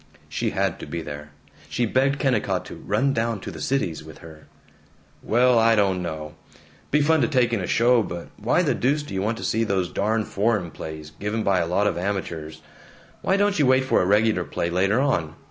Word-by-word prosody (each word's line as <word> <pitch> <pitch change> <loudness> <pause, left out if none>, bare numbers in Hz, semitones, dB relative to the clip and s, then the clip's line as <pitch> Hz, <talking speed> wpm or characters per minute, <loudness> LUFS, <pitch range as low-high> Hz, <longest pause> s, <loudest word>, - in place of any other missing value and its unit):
She - - -2
had - - -1
to - - -8
be 85 -1 -4
there! 75 0 -8 0.4
She 120 - 0
begged 135 +5 +1
Kennicott 130 -7 0
to - - -9
"run 130 +7 0
down 115 -2 -1
to - - -6
the - - -9
Cities" 105 - -1
with 80 0 -12
her. 80 -1 -14 0.7
"Well, 120 +1 +3
I 115 0 +4
don't 95 -3 +2
know. 80 -3 -5 0.6
Be 150 - +3
fun 160 +1 +3
to 120 - +3
take 125 -5 +2
in 110 - 0
a 90 - -3
show, 120 +1 +4
but 85 -4 -6
why 120 - +1
the 145 -6 +2
deuce 140 +5 0
do 145 - -9
you 95 - -1
want 110 +3 -1
to - - -7
see 115 - +1
those 95 -5 -1
darn 110 +2 0
foreign 100 -4 0
plays, 80 -1 -8
given 105 +7 -3
by 95 -2 +2
a 85 - 0
lot 95 +4 +1
of 85 -4 0
amateurs? 80 -5 -4 0.6
Why 190 - +2
don't 205 -2 +2
you 145 - +4
wait 130 0 +4
for 130 - +3
a - - +1
regular 105 -2 +3
play, 85 0 -3
later 95 +6 +2
on? 85 - 0
105 Hz, 215 wpm, -24 LUFS, 85-125 Hz, 0.7 s, I